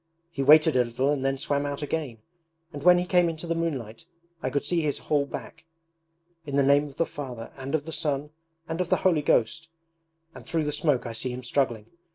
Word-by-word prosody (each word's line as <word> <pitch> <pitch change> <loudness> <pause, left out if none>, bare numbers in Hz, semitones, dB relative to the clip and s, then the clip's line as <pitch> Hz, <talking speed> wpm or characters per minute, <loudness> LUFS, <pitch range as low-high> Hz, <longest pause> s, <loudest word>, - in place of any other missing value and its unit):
He 145 - -3
waited 155 +2 +6
a 125 - +5
little 125 +4 0
and 140 -3 -1
then 135 0 0
swam 140 +1 -1
out 145 0 -4
again; 140 -8 -4 0.5
and 145 - -6
when 180 +3 +7
he 175 - 0
came 180 -2 +3
into 160 +1 -6
the 165 - -1
moonlight 145 -6 -4 0.3
I 130 - -1
could 140 +2 -1
see 170 +3 0
his 150 -3 -1
whole 145 -2 0
back. - - -8 0.8
"In 140 -3 -5
the 140 - +4
name 140 +2 +4
of 140 - -13
the 165 - +2
Father 125 -7 -7
and 135 +2 -3
of 150 -2 -2
the 160 - -6
Son 150 -2 -2 0.4
and 165 +2 -2
of 180 - -2
the - - +4
Holy 170 -5 +4
Ghost"... 145 +3 +1 0.7
and - - -11
through 165 -2 -1
the 150 - -1
smoke 145 -4 +1
I 115 - -5
see 115 +3 -2
him 125 +1 -6
struggling. 120 -4 0
145 Hz, 220 wpm, -26 LUFS, 130-160 Hz, 0.8 s, when